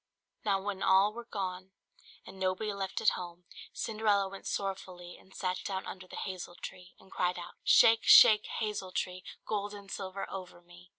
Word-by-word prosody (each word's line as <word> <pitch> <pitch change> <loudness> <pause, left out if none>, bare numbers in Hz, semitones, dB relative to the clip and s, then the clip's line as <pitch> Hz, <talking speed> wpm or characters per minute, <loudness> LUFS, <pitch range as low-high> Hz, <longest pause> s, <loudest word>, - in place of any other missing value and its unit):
Now 200 -2 +2
when 195 0 -4
all 195 +2 +4
were 235 +1 -8
gone, 190 -3 -5 0.5
and 190 +1 -12
nobody 190 +3 -1
left 195 -1 -3
at 215 - +6
home, 175 -1 -7 0.3
Cinderella 215 -3 +1
went 195 0 -9
sorrowfully 185 -3 -4
and 190 - -20
sat 185 0 -2
down 190 -1 -3
under 185 -1 -8
the - - -10
hazel 185 -2 -6
tree, 180 0 -10
and 190 - -20
cried 180 0 0
out 175 - -8
"Shake, 225 0 +6
shake, 215 -1 +8
hazel 210 -4 -3
tree, 185 0 -3 0.2
Gold 205 -1 -3
and 200 -1 -11
silver 195 0 -5
over 185 -2 -8
me!" 175 +1 -17
190 Hz, 175 wpm, -31 LUFS, 185-205 Hz, 0.5 s, shake